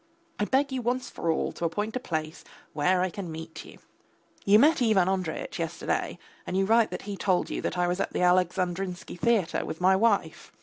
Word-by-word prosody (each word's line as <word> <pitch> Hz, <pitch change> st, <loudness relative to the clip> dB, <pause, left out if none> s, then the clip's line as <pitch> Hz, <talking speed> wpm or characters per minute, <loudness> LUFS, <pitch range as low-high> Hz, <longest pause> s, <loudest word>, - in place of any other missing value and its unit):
I 210 Hz, -, +1 dB
beg 275 Hz, +4 st, +1 dB
you 260 Hz, -1 st, -2 dB
once 245 Hz, +2 st, -2 dB
for 170 Hz, -, -3 dB
all 160 Hz, -, 0 dB
to 170 Hz, -, -4 dB
appoint 210 Hz, +7 st, -2 dB
a -, -, 0 dB
place 155 Hz, -7 st, -4 dB, 0.3 s
where 180 Hz, +5 st, +2 dB
I 185 Hz, -, -1 dB
can 185 Hz, -4 st, -6 dB
meet 160 Hz, 0 st, -8 dB
you. -, -, -13 dB, 0.7 s
You 200 Hz, +1 st, +6 dB
met 295 Hz, +5 st, +4 dB
Ivan 215 Hz, -6 st, +3 dB
Andreyitch 185 Hz, -4 st, -3 dB
yesterday, -, -, -2 dB, 0.3 s
and 185 Hz, -, -2 dB
you 195 Hz, -, +2 dB
write 225 Hz, +2 st, +4 dB
that -, -, -6 dB
he 205 Hz, 0 st, -5 dB
told 185 Hz, -2 st, 0 dB
you -, -, -3 dB
that -, -, -3 dB
I 180 Hz, -, +2 dB
was 180 Hz, +1 st, -1 dB
at 195 Hz, -, -1 dB
the -, -, -2 dB
Alexandrinsky 180 Hz, 0 st, 0 dB
theatre 225 Hz, -7 st, +1 dB
with 160 Hz, -, -6 dB
my 185 Hz, +1 st, +4 dB
wife. 200 Hz, -6 st, 0 dB
185 Hz, 210 wpm, -27 LUFS, 175-215 Hz, 0.7 s, You